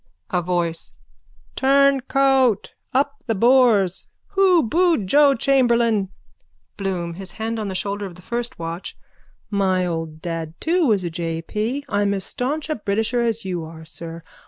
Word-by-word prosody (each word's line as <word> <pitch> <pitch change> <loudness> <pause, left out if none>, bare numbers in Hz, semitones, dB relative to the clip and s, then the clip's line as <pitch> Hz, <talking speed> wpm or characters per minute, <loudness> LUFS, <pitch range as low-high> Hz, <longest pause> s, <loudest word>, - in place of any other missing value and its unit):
A 180 - +1
VOICE: 170 -1 -2 0.6
Turncoat! 270 -3 +3 0.2
Up 280 +3 0
the 225 - +1
Boers! 230 -5 +4 0.2
Who 380 -4 +4
booed 330 - +2
Joe 280 +7 +5
Chamberlain? 235 -6 +2 0.7
BLOOM: 180 -4 -3
(His 190 +2 -7
hand 225 +1 -3
on 215 - -3
the 190 - -4
shoulder 200 +1 -2
of 175 - -11
the 180 - -14
first 240 +1 -3
watch.) 165 +2 -6 0.5
My 190 -2 +1
old 165 -2 -4
dad 165 -1 -5
too 335 -1 +2
was 205 -5 +2
a 170 - -3
J. 165 0 -3
P. 235 +10 -3
I'm 205 0 +1
as 195 - -3
staunch 285 +9 -3
a 310 - 0
Britisher 220 +3 -1
as 230 -3 -1
you 180 -3 -3
are, 160 0 -10
sir. 165 0 -8
210 Hz, 155 wpm, -22 LUFS, 175-265 Hz, 0.7 s, Joe